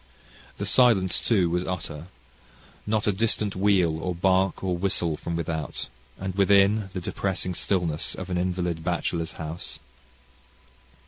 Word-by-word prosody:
The - - -3
silence, 110 -8 +4
too, 100 -7 +3
was 90 +1 0
utter: 85 -3 -5 0.8
not 105 0 +1
a 105 - +3
distant 105 0 0
wheel, 95 -5 +2
or 90 +2 -2
bark, 95 +1 +2
or 90 -2 0
whistle 85 -3 0
from 85 +2 -4
without; 80 -4 -3 0.3
and 95 0 -4
within 100 +1 +4
the 95 - -2
depressing 95 +1 -2
stillness 85 -2 -1
of 95 0 -6
an 90 - 0
invalid 90 -2 -1
bachelor's 85 -1 -1
house. 80 +1 -6
90 Hz, 135 wpm, -26 LUFS, 85-95 Hz, 0.8 s, silence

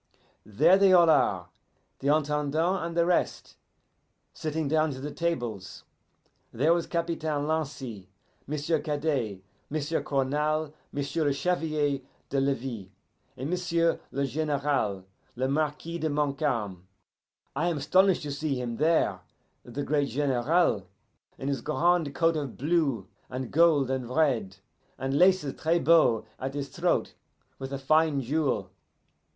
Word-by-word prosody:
There 115 - +4
they 195 -1 +6
all 170 -3 +7
are, 95 - +2 0.5
the 135 - -3
Intendant 150 +4 +1
and 170 0 -4
the 170 - +4
rest, 180 0 -1 0.8
sitting 155 -1 -3
down 155 +2 +2
to 130 - -8
the 145 +2 -5
tables. 120 - -3 0.7
There 150 +8 +3
was 170 -1 -1
Capitaine 160 -4 -2
Lancy, 135 -11 -3 0.4
M'sieu' 150 +2 0
Cadet, 145 - -2 0.3
M'sieu' 155 +2 -1
Cournal, 150 +3 0 0.2
M'sieu' 145 +3 -2
le 145 - +3
Chevalier 150 -3 0 0.3
de 140 - +1
Levis, 130 -7 -2 0.5
and 135 +5 -4
M'sieu' 170 -2 +1
le 140 0 -1
Generale, 140 -8 -1 0.3
le 130 +2 0
Marquis 155 +4 -2
de 160 - -1
Montcalm. 135 - -1 0.7
I 170 - 0
am 170 -3 0
astonish 185 +6 +3
to 145 - -4
see 140 -2 -2
him 120 -2 -4
there, 160 +2 +2 0.4
the 130 +4 -5
great 145 -1 0
General, 135 - +1 0.5
in 135 - -5
his 140 -3 -1
grand 165 0 +1
coat 165 +2 +2
of 145 -5 -4
blue 140 - 0 0.2
and 130 -1 -5
gold 155 -5 +4
and 130 -2 -2
red, 125 -9 +1 0.4
and 135 +1 -2
laces 180 -6 +4
tres 165 +2 +2
beau 155 -7 +4
at 135 +1 -4
his 140 -1 -3
throat, - - 0 0.5
with 135 0 -6
a 140 - -2
fine 155 +2 +2
jewel. 130 -8 -1
145 Hz, 135 wpm, -28 LUFS, 130-160 Hz, 0.8 s, all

